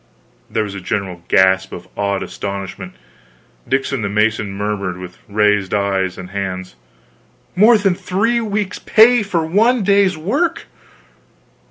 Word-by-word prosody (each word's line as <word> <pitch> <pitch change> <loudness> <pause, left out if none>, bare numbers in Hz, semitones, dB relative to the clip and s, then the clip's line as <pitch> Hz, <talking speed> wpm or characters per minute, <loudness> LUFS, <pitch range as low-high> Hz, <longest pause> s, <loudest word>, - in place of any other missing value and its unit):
There - - 0
was 105 -2 -6
a 100 - -7
general 95 -3 -3
gasp 95 0 +3
of - - -9
awed 100 -1 -1
astonishment, 95 -2 -6 0.7
Dickon 135 -1 0
the 100 - -2
mason 105 0 0
murmured, 100 -2 -3
with 90 -1 -10
raised 105 -1 +2
eyes 95 -2 -1
and 90 0 -9
hands: 95 -3 -4 0.8
"More 220 +5 +6
than 200 -3 +2
three 225 +7 0
weeks' 210 -2 -2
pay 235 +2 +5
for 180 -6 -1
one 220 +7 +2
day's 200 -2 +3
work!" 290 - -1
105 Hz, 135 wpm, -18 LUFS, -, 0.8 s, More